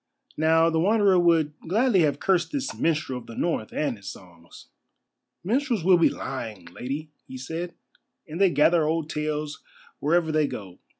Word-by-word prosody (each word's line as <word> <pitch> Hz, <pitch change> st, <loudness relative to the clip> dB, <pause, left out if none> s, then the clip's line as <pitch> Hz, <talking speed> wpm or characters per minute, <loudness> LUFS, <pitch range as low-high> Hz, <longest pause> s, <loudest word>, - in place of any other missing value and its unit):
Now, 160 Hz, +1 st, +4 dB
the 160 Hz, -, +1 dB
Wanderer 200 Hz, 0 st, +4 dB
would 165 Hz, -3 st, +3 dB
gladly 220 Hz, +3 st, +3 dB
have 145 Hz, -3 st, +2 dB
cursed 185 Hz, -3 st, +1 dB
this 280 Hz, -2 st, -3 dB
minstrel 155 Hz, -6 st, -1 dB
of 120 Hz, -, -16 dB
the 115 Hz, -, -9 dB
North 160 Hz, -10 st, -2 dB
and 140 Hz, -6 st, -2 dB
his 100 Hz, -, -13 dB
songs. 85 Hz, -2 st, -15 dB, 0.8 s
"Minstrels 235 Hz, -, 0 dB
will 180 Hz, 0 st, +5 dB
be 170 Hz, -, +5 dB
lying, 115 Hz, -8 st, -6 dB
Lady," 145 Hz, +5 st, -5 dB, 0.2 s
he 130 Hz, -, -8 dB
said, 165 Hz, +7 st, -5 dB, 0.5 s
"and 165 Hz, +4 st, -5 dB
they 195 Hz, -, +6 dB
gather 160 Hz, +1 st, +3 dB
old 160 Hz, -1 st, -1 dB
tales 150 Hz, 0 st, -3 dB, 0.4 s
wherever 165 Hz, +1 st, +1 dB
they 155 Hz, -1 st, +2 dB
go. 95 Hz, -8 st, -8 dB
160 Hz, 165 wpm, -25 LUFS, 140-175 Hz, 0.8 s, they